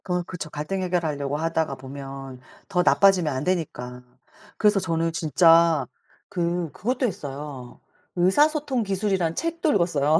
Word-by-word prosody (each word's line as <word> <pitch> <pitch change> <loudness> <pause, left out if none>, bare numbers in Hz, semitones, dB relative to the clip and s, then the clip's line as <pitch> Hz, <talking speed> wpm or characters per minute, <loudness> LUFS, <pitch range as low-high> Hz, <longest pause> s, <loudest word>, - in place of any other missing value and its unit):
어 180 0 0
그쵸. 170 -2 -7
갈등 150 +6 -3
해결하려고 155 -6 -1
하다가 160 -2 -1
보면 135 0 -9 0.3
더 180 - +2
나빠지면 185 -6 +4
안 130 +1 -3
되니까. 135 -9 -3 0.6
그래서 210 -2 +3
저는 165 -2 -1
진짜 165 -1 +4 0.4
그 175 -2 -2
그것도 250 +5 -1
했어요. 145 - -6 0.4
의사소통 275 - +2
기술이라는 190 -4 -1
책도 335 -1 0
읽었어요. 155 -4 +2
165 Hz, 310 characters per minute, -24 LUFS, 145-190 Hz, 0.6 s, 나빠지면